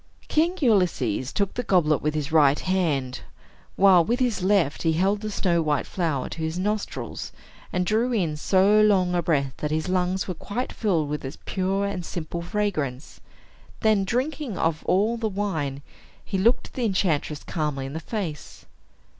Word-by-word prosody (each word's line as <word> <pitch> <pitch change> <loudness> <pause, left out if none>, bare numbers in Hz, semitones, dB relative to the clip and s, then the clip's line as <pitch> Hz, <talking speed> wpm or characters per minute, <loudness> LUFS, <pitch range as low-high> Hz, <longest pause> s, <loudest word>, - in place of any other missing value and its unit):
King 335 +4 +1
Ulysses 170 - +1
took 200 -2 -1
the 245 - -2
goblet 175 -9 +2
with 150 0 -1
his 150 0 -2
right 150 -3 +5
hand, 150 -9 0 0.6
while 190 -3 +6
with 240 +9 0
his 245 -6 0
left 185 -6 +2
he 165 -1 +2
held 195 +5 +1
the 215 - -3
snow 175 -4 +1
white 150 -3 0
flower 160 -8 -2
to - - -8
his 160 +2 -2
nostrils, 210 +3 -3 0.4
and 180 0 0
drew 225 +5 +1
in 175 -10 0
so 195 +6 +4
long 190 -4 +3
a 175 - +2
breath 140 -6 0
that 150 - -3
his 155 +2 -1
lungs 185 +1 0
were 185 - -2
quite 205 +8 -4
filled 175 -9 0
with 150 +1 -4
its 135 +2 -6
pure 195 +1 0
and 200 -3 -3
simple 170 0 -5
fragrance. 170 - -3 0.6
Then, 215 -3 +3
drinking 255 - -2
off 160 -1 0
all 210 +6 +2
the 225 -1 -1
wine, 160 -9 -3 0.4
he 195 - -2
looked 230 +6 +1
the 255 - -3
enchantress 165 -7 0
calmly 150 -4 -2
in 135 - -6
the 160 - -3
face. 165 -4 -6
180 Hz, 170 wpm, -25 LUFS, 155-205 Hz, 0.6 s, while